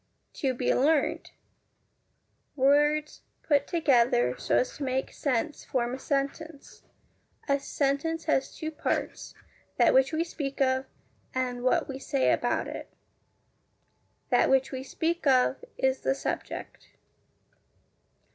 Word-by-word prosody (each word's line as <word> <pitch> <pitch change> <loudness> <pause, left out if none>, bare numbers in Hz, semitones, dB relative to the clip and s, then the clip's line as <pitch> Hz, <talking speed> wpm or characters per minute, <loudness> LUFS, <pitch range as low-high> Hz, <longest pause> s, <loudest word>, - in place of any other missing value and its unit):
To 265 -4 -1
be 245 - +1
learnt 290 +2 +1 1.3
Words 295 +2 +2 0.2
put 285 -2 +2
together 240 - +3
so - - 0
as 250 - -1
to 290 - -5
make 265 0 -2
sense 280 +2 -2
form 245 -1 -1
a 265 - -5
sentence. 280 +2 -4 0.7
A 280 -1 +2
sentence 290 +4 -1
has 270 -4 0
two 315 0 -4
parts: 310 - -3 0.4
that - - +5
which 265 +2 +4
we 320 +1 0
speak 285 -5 -5
of, 260 0 +1 0.5
and 250 -1 -1
what 255 - +2
we 270 -1 -6
say 270 0 +1
about - - 0
it. - - -8 1.4
That - - +4
which 265 0 +3
we 260 -1 -4
speak 325 +4 -2
of 260 - +3
is 265 0 +1
the 135 0 +1
SUBJECT. 135 - -5
275 Hz, 125 wpm, -28 LUFS, 260-300 Hz, 1.4 s, that